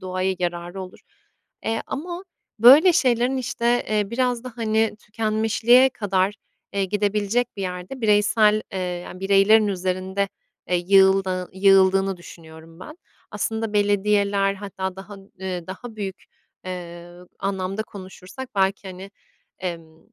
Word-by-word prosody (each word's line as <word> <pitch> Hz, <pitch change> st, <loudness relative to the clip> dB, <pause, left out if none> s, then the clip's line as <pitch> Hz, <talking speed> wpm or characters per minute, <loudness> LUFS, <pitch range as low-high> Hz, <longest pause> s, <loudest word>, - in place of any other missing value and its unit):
doğaya 185 Hz, 0 st, -2 dB
yararı 175 Hz, +1 st, -4 dB
olur. 185 Hz, 0 st, -11 dB, 0.7 s
Eee, 225 Hz, 0 st, -1 dB
ama, 350 Hz, +6 st, -5 dB, 0.3 s
böyle, 285 Hz, -, +8 dB
şeylerin, 255 Hz, -4 st, +2 dB
işte, 240 Hz, -1 st, 0 dB
eee, 210 Hz, -2 st, 0 dB
biraz 245 Hz, 0 st, -1 dB
da, 255 Hz, -, -7 dB
hani, 220 Hz, -1 st, 0 dB
tükenmişliğe 225 Hz, +4 st, +3 dB
kadar, 195 Hz, -3 st, 0 dB, 0.4 s
eee, 200 Hz, -1 st, 0 dB
gidebilecek 210 Hz, +4 st, -1 dB
bir 195 Hz, -, -4 dB
yerde 180 Hz, +7 st, -6 dB
bireysel, 210 Hz, 0 st, +3 dB
eee, 190 Hz, -, -3 dB
yani, 180 Hz, 0 st, -5 dB
bireylerin 200 Hz, +3 st, +4 dB
üzerinde, 190 Hz, +1 st, -2 dB, 0.4 s
eee, 180 Hz, -, +2 dB
yığıldığı 190 Hz, 0 st, +3 dB
yığıldığını 195 Hz, 0 st, +4 dB
düşünüyorum 165 Hz, 0 st, -14 dB
ben. 305 Hz, -, -11 dB, 0.3 s
Aslında 220 Hz, -1 st, -2 dB
belediyeler, 205 Hz, -1 st, +2 dB
hatta 190 Hz, -2 st, -5 dB
daha 195 Hz, +2 st, -10 dB
ııı, 190 Hz, -3 st, -7 dB
daha 220 Hz, +4 st, -9 dB
büyük, 195 Hz, -2 st, -6 dB, 0.4 s
eee, 175 Hz, -1 st, -8 dB, 0.2 s
anlamda 195 Hz, +1 st, -2 dB
konuşursak 200 Hz, +5 st, -10 dB
belki, 195 Hz, 0 st, 0 dB
hani, 190 Hz, +1 st, -9 dB, 0.5 s
emm, 165 Hz, -3 st, -6 dB
195 Hz, 120 wpm, -23 LUFS, 185-220 Hz, 0.7 s, böyle